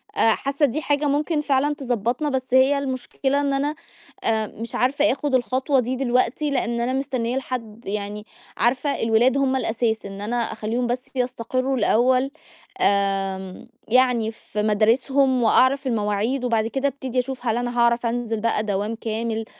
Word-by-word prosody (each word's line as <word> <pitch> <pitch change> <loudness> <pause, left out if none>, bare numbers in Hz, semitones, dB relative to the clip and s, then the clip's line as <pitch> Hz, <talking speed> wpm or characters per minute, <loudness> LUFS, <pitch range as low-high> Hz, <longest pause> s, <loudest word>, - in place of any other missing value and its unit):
آآ 225 - +4
حاسَّة 280 +2 0
دي 285 +3 -2
حاجة 290 0 0
ممكن 295 +2 +1
فعلًا 290 0 +1
تضبطنا، 245 +2 -1
بس 260 -2 -3
هي 265 +2 +5
المُشكلة 270 +1 -1
إن 280 -1 0
أنا 285 +2 0 0.5
آآ 220 -1 +1
مش 230 +3 -8
عارفة 285 +4 +2
آخُد 275 +1 -1
الخطوة 260 +3 +1
دي 250 +1 -1
دلوقتي، 255 +3 +1
لإن 235 -4 -1
أنا 245 +2 0
مستنية 260 -2 -1
لحد 235 -4 -5
يعني 205 +1 -4 0.3
عارفة 255 +5 +1
الولاد 230 +4 +3
هُم 270 -1 +2
الأساس، 225 -3 -1
إن 195 0 -7
أنا 230 +4 -2
أخلّيهُم 235 +3 -2
بس 245 +1 -1
يستقرُّوا 255 +1 -1
الأول، 255 +3 +3 0.5
آمم 195 - 0 0.2
يعني 240 -2 +3
في 215 -1 -5
مدارسهُم 250 +5 +2
وأعرف 260 +4 +3
المواعيد، 220 +3 0
وبعد 225 -2 +1
كده 270 +4 -1
أبتدي 265 -2 -3
أشوف 260 0 -4
هل 225 -1 +1
أنا 245 0 -3
هاعرف 235 0 +3
أنزل 230 -1 -1
بقى 225 -1 +1
دوام 205 +1 -2
كامل، 225 0 -3
245 Hz, 155 wpm, -23 LUFS, 225-270 Hz, 0.5 s, هي